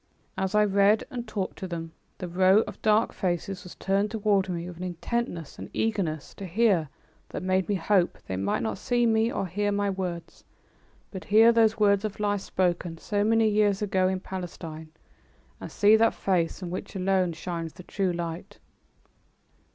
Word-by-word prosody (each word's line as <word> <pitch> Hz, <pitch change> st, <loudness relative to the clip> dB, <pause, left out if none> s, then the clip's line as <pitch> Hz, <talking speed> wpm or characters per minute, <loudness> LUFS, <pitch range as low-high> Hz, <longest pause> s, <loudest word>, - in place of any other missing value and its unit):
As 190 Hz, +2 st, -2 dB
I 210 Hz, 0 st, +5 dB
read 200 Hz, +2 st, +3 dB
and 240 Hz, -3 st, -5 dB
talked 205 Hz, -3 st, -4 dB
to 190 Hz, -, -4 dB
them, 165 Hz, -2 st, -5 dB, 0.3 s
the 180 Hz, -, -5 dB
row 185 Hz, +4 st, +4 dB
of -, -, -8 dB
dark 215 Hz, +1 st, +3 dB
faces 180 Hz, +1 st, -2 dB
was 180 Hz, -, -11 dB
turned 195 Hz, +2 st, 0 dB
toward 205 Hz, -3 st, +1 dB
me 175 Hz, -1 st, -3 dB
with 180 Hz, -2 st, -9 dB
an 180 Hz, -, -6 dB
intentness 175 Hz, -, -4 dB
and -, -, -7 dB
eagerness 190 Hz, -9 st, -2 dB
to 195 Hz, -, -6 dB
hear 185 Hz, -5 st, +2 dB, 0.4 s
that -, -, -5 dB
made 185 Hz, +1 st, +1 dB
me 205 Hz, -, +2 dB
hope 185 Hz, 0 st, +1 dB
they 95 Hz, -, -4 dB
might 95 Hz, +4 st, -1 dB
not 110 Hz, -2 st, -3 dB
see 240 Hz, -1 st, +1 dB
me 225 Hz, 0 st, +2 dB
or -, -, -2 dB
hear 205 Hz, +3 st, -1 dB
my 200 Hz, 0 st, 0 dB
words, 180 Hz, -3 st, -5 dB, 0.7 s
but 190 Hz, -2 st, -7 dB
hear 220 Hz, +3 st, +6 dB
those 225 Hz, -1 st, +3 dB
words 200 Hz, -1 st, +4 dB
of 215 Hz, -1 st, -4 dB
life 205 Hz, -1 st, 0 dB
spoken 175 Hz, -3 st, -1 dB
so 205 Hz, +4 st, -1 dB
many 225 Hz, +1 st, +3 dB
years 210 Hz, -1 st, +2 dB
ago 190 Hz, -2 st, +2 dB
in 185 Hz, 0 st, -1 dB
Palestine, 165 Hz, -4 st, -7 dB, 0.7 s
and -, -, -8 dB
see 210 Hz, +1 st, +5 dB
that 225 Hz, +1 st, +3 dB
Face 175 Hz, -4 st, 0 dB
from 180 Hz, -2 st, -6 dB
which 185 Hz, -, -6 dB
alone 185 Hz, -1 st, +1 dB
shines 165 Hz, -1 st, -5 dB
the 180 Hz, -, -12 dB
true 190 Hz, 0 st, -1 dB
light. 170 Hz, 0 st, -5 dB
190 Hz, 180 wpm, -27 LUFS, 175-210 Hz, 0.7 s, hear